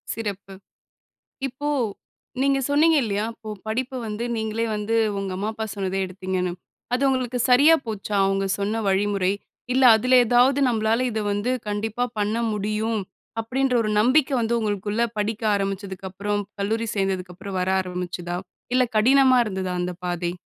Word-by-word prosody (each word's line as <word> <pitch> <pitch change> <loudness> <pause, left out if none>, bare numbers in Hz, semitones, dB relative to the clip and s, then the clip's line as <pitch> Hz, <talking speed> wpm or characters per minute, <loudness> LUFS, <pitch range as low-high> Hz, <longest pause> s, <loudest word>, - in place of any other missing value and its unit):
சிறப்பு! 200 -3 -5 0.9
இப்போ 270 +3 -4 0.7
நீங்க 275 0 +3
சொன்னீங்க 315 +3 +4
இல்லயா! 205 -1 -1
இப்போ 220 -1 -9 0.2
படிப்ப 255 +4 -2
வந்து 215 +2 -3
நீங்களே 220 +1 -1
வந்து 210 +2 -2 0.2
உங்க 195 -1 -3
அம்மா, 200 +3 -2
அப்பா 220 0 -4
சொன்னதே 195 -1 -2
எடுத்தீங்கன்னு. 185 -1 -3 0.4
அது 250 - 0
உங்களுக்கு 255 -2 0
சரியா 285 +6 +7
போச்சா? 210 -1 -4
அவுங்க 195 0 0
சொன்ன 210 +3 -1
வழிமுறை? 195 -1 +1 0.4
இல்ல, 260 0 +4
அதுல 255 +4 +2
ஏதாவது, 245 +4 +4
"நம்பளால 225 0 +1
இத 220 -1 -2
வந்து 205 +5 -1 0.2
கண்டிப்பா 220 +3 -1
பண்ண 210 +2 0 0.2
முடியும்." 215 +2 -1 0.4
அப்பிடீன்ற 255 +3 0
ஒரு 215 - -1
நம்பிக்கை 265 +5 +3
வந்து 235 +1 +1
உங்களுக்குள்ள 210 0 -1 0.2
படிக்க 215 +2 -2
ஆரம்பிச்சதுக்கப்புறம், 195 +1 -3 0.2
கல்லூரி 225 +3 -1
சேர்ந்ததுக்கப்புறம் 190 0 -3
வர 180 - -1
ஆரம்பிச்சுதா? 180 -1 -4 0.4
இல்ல, 255 0 +5
கடினமா 260 +3 +5
இருந்ததா 190 -3 -3
அந்த 180 0 -2
பாதை? 175 -1 -1
215 Hz, 140 wpm, -24 LUFS, 195-240 Hz, 0.9 s, சரியா